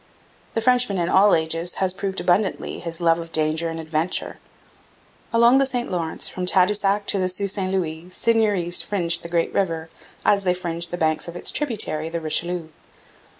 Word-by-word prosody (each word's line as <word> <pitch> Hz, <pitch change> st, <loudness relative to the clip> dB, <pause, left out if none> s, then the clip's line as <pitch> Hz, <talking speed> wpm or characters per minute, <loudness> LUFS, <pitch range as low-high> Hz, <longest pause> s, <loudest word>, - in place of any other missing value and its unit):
The 225 Hz, -, +1 dB
Frenchman 245 Hz, -4 st, +2 dB
in 175 Hz, -1 st, 0 dB
all 200 Hz, +2 st, +5 dB
ages 165 Hz, +2 st, -1 dB
has 190 Hz, -1 st, +1 dB
proved 195 Hz, 0 st, -3 dB
abundantly 190 Hz, +3 st, 0 dB
his 170 Hz, 0 st, -6 dB
love 165 Hz, 0 st, +3 dB
of 165 Hz, 0 st, -8 dB
danger 160 Hz, +1 st, +1 dB
and 165 Hz, 0 st, -5 dB
adventure. 160 Hz, +2 st, -2 dB, 0.9 s
Along 235 Hz, +3 st, +5 dB
the 275 Hz, -, +3 dB
St 245 Hz, -2 st, -3 dB
Lawrence 165 Hz, -3 st, -1 dB
from 180 Hz, -1 st, -4 dB
Tadoussac 200 Hz, +2 st, +2 dB
to 200 Hz, -, +1 dB
the 185 Hz, -1 st, +1 dB
Sault 195 Hz, +2 st, -1 dB
St 190 Hz, -2 st, -3 dB
Louis 170 Hz, -3 st, -2 dB
seigneuries 205 Hz, -4 st, +1 dB
fringed 170 Hz, -4 st, -1 dB
the 170 Hz, -, -8 dB
great 170 Hz, -1 st, 0 dB
river, 165 Hz, -4 st, -1 dB, 0.4 s
as 200 Hz, -1 st, +3 dB
they 180 Hz, -1 st, +1 dB
fringed 170 Hz, -1 st, -4 dB
the 175 Hz, -, -4 dB
banks 155 Hz, -1 st, +1 dB
of 170 Hz, -, -7 dB
its 175 Hz, -, -2 dB
tributary, 200 Hz, -, -1 dB
the 170 Hz, 0 st, -3 dB
Richelieu. 165 Hz, +1 st, -1 dB
180 Hz, 180 wpm, -22 LUFS, 165-200 Hz, 0.9 s, all